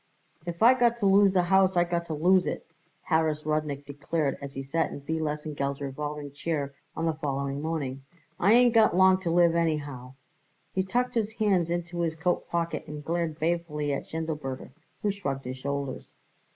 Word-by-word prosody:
"If 170 Hz, +3 st, -2 dB
I 245 Hz, +3 st, +9 dB
got 240 Hz, -2 st, +2 dB
to 220 Hz, -, -1 dB
lose 195 Hz, 0 st, +5 dB
the 180 Hz, -2 st, +3 dB
house 190 Hz, 0 st, +3 dB
I 175 Hz, -, +6 dB
got 170 Hz, -1 st, -2 dB
to 155 Hz, -, -3 dB
lose 180 Hz, +4 st, +4 dB
it," -, -, -3 dB, 0.4 s
Harris 160 Hz, -2 st, +1 dB
Rudnik 150 Hz, -2 st, -1 dB
declared 145 Hz, +1 st, -2 dB
as 140 Hz, -1 st, -7 dB
he 135 Hz, -, -5 dB
sat 160 Hz, +4 st, 0 dB
in -, -, -8 dB
B. 160 Hz, +3 st, -2 dB
Lesengeld's 150 Hz, -2 st, -3 dB
revolving 145 Hz, +1 st, -5 dB
chair 145 Hz, -1 st, -3 dB, 0.2 s
on 165 Hz, -, -2 dB
the 165 Hz, -, +1 dB
following 140 Hz, -2 st, -3 dB
morning. 145 Hz, -4 st, -3 dB, 0.4 s
"I 200 Hz, +5 st, +5 dB
ain't 245 Hz, 0 st, +6 dB
got 220 Hz, -5 st, +5 dB
long 190 Hz, 0 st, +5 dB
to 175 Hz, -, -2 dB
live 170 Hz, 0 st, +4 dB
anyhow." 145 Hz, -6 st, -2 dB, 0.6 s
He 190 Hz, -, +1 dB
tucked 245 Hz, +7 st, 0 dB
his 220 Hz, -3 st, -1 dB
hands 195 Hz, -7 st, +1 dB
into 175 Hz, 0 st, -3 dB
his 165 Hz, -2 st, 0 dB
coat 175 Hz, +2 st, -1 dB
pocket 170 Hz, -1 st, -2 dB
and 150 Hz, -1 st, -7 dB
glared 165 Hz, -1 st, -1 dB
balefully 155 Hz, -3 st, -1 dB
at 140 Hz, -, -4 dB
Schindelberger, 150 Hz, -6 st, -4 dB, 0.3 s
who 205 Hz, -, +2 dB
shrugged 140 Hz, -10 st, -4 dB
his 130 Hz, +1 st, -5 dB
shoulders. 140 Hz, -1 st, -4 dB
160 Hz, 185 wpm, -27 LUFS, 145-180 Hz, 0.6 s, I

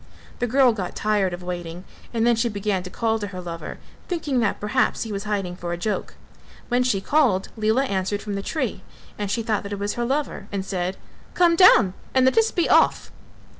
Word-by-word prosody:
The 245 Hz, -, 0 dB
girl 255 Hz, 0 st, +4 dB
got 185 Hz, -5 st, -5 dB
tired 210 Hz, -3 st, +1 dB
of 175 Hz, +1 st, -7 dB
waiting 175 Hz, -1 st, -5 dB, 0.3 s
and 230 Hz, -1 st, 0 dB
then 240 Hz, 0 st, +4 dB
she 230 Hz, +1 st, 0 dB
began 200 Hz, -2 st, -1 dB
to 180 Hz, -, -8 dB
call 225 Hz, +3 st, 0 dB
to 205 Hz, -, -4 dB
her 185 Hz, -2 st, -7 dB
lover, 170 Hz, -2 st, -6 dB, 0.3 s
thinking 300 Hz, -7 st, -1 dB
that 215 Hz, -4 st, 0 dB
perhaps 215 Hz, +5 st, 0 dB
he 225 Hz, -, -6 dB
was 200 Hz, +1 st, -4 dB
hiding 195 Hz, -4 st, -2 dB
for 175 Hz, -1 st, -4 dB
a -, -, -3 dB
joke. 210 Hz, +4 st, -3 dB, 0.5 s
When 245 Hz, 0 st, +2 dB
she 245 Hz, -6 st, +1 dB
called, 235 Hz, -9 st, +2 dB
Lela 220 Hz, +4 st, +2 dB
answered 200 Hz, -2 st, -2 dB
from 210 Hz, -, -4 dB
the 200 Hz, -, -2 dB
tree 255 Hz, -4 st, -3 dB, 0.4 s
and 205 Hz, -1 st, -2 dB
she 225 Hz, +3 st, -1 dB
thought 215 Hz, -2 st, 0 dB
that 200 Hz, 0 st, -6 dB
it -, -, -3 dB
was 205 Hz, +1 st, -2 dB
her 240 Hz, -, -2 dB
lover 265 Hz, -5 st, -2 dB
and 195 Hz, -1 st, -3 dB
said 185 Hz, -1 st, -2 dB, 0.4 s
"Come 345 Hz, -1 st, +4 dB
down 245 Hz, -, +6 dB, 0.2 s
and 260 Hz, -1 st, +5 dB
let 260 Hz, -, +3 dB
us 450 Hz, 0 st, +4 dB
be 345 Hz, -, 0 dB
off." -, -, +3 dB
210 Hz, 215 wpm, -23 LUFS, 190-245 Hz, 0.5 s, down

